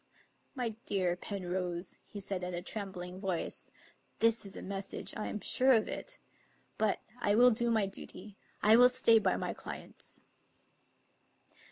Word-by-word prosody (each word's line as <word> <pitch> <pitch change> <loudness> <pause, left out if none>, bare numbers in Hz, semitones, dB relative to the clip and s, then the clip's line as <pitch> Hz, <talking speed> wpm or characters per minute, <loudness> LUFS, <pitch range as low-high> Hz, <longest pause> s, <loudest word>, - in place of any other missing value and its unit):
" - - -41
My 250 -3 -1 0.2
dear 185 -3 +1
Penrose," 180 -2 -4
he 205 - -8
said 190 -2 -4
in 180 0 -3
a 175 - -4
trembling 185 -3 -6
voice, 190 -4 -3 0.3
" - - -41
this, 230 -2 +3
is 195 - -3
a - - -7
message; 195 0 -3
I 215 - -3
am 210 - -3
sure 260 +1 +4
of 220 -3 +3
it. - - -5 0.6
But 215 -2 +1 0.2
I 205 -3 +2
will 245 +2 +7
do 235 +1 +1
my 220 -3 +3
duty; 195 +1 -6 0.3
I 215 +2 +7
will 250 +1 +8
stay 235 -3 +5
by - - +1
my - - -2
clients." - - -9
205 Hz, 165 wpm, -33 LUFS, 185-230 Hz, 0.6 s, will